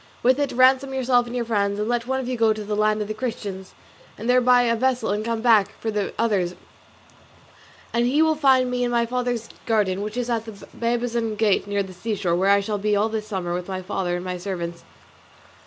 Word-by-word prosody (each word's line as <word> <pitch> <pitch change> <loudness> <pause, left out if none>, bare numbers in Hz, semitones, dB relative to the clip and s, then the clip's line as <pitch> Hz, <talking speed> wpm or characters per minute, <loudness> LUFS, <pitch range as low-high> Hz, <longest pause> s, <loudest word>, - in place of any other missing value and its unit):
With 255 +3 +4
it 285 -1 0
ransom 260 +2 +3
yourself 245 -2 +2
and 240 - -6
your 240 -1 -1
friends, 200 -3 0
and 210 - -1
let 240 0 -1
one 265 0 0
of 260 - -4
you 255 - -2
go 225 -2 +3
to 215 0 -6
the 210 0 -3
land 215 0 +1
of - - -8
the 215 - -3
Christians, 205 -5 -5 0.4
and 225 - -6
there 250 0 +4
buy 250 0 +5
a 230 -1 +2
vessel 250 -2 0
and 210 +1 -1
come 230 0 -2
back 215 -5 +3
for 225 - -2
the 210 -2 -2
others; 195 -6 0 1.4
and 235 +1 +2
he 290 +5 +3
will 315 0 +3
find 265 -4 +3
me 250 0 0
in 245 - 0
my 235 -1 +1
father's 245 -1 -2 0.2
garden, 205 -4 +1
which 210 +3 -5
is 245 -1 -1
at 230 -2 -1
the 220 - -8 0.2
Babazon 235 -1 -1
gate 210 -2 +1
near 200 0 0
the 190 -1 -10
seashore, 185 -2 -1
where 190 +3 +2
I 200 0 +5
shall 205 +1 -3
be 210 +1 +1
all 210 +2 +2
this 215 -1 -4
summer 185 -5 -3
with 180 0 -4
my 185 -1 -4
father 180 -1 -2
and 175 +1 -5
my 180 0 -3
servants. 175 -2 -5
220 Hz, 235 wpm, -23 LUFS, 200-245 Hz, 1.4 s, buy